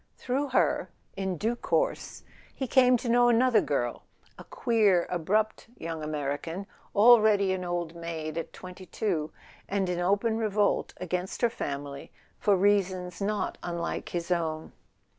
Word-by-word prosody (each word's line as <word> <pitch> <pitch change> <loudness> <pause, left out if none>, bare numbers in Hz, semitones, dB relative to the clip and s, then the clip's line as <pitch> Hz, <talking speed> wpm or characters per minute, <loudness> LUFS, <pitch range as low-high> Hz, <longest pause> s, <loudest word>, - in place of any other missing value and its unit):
Through 270 +3 -1
her, 255 - +1 0.3
in 190 -2 -2
due 225 +7 0
course, - - -1 0.3
he 265 - -2
came 250 0 +5
to 240 - -6
know 240 +1 +5
another 240 0 +4
girl, - - -2 0.3
a - - -11
queer 220 - +2
abrupt 210 +7 0
young 165 -1 -5
American, 150 +5 -3 0.3
already 210 -3 +6
an 185 -1 -3
old 175 -2 -3
maid 165 -2 -5
at 165 - -4
twenty 185 0 -11
two, 165 -8 -2 0.4
and 195 -1 0
in 175 -1 -1
open 205 +5 +1
revolt 210 -2 +1
against 180 +4 -4
her 235 - +4
family 140 -5 -5 0.3
for 200 -2 +3
reasons 185 -2 +1
not 210 +1 -2
unlike 170 -1 -4
his 175 0 -4
own. 160 -2 -1
190 Hz, 140 wpm, -28 LUFS, 170-220 Hz, 0.4 s, already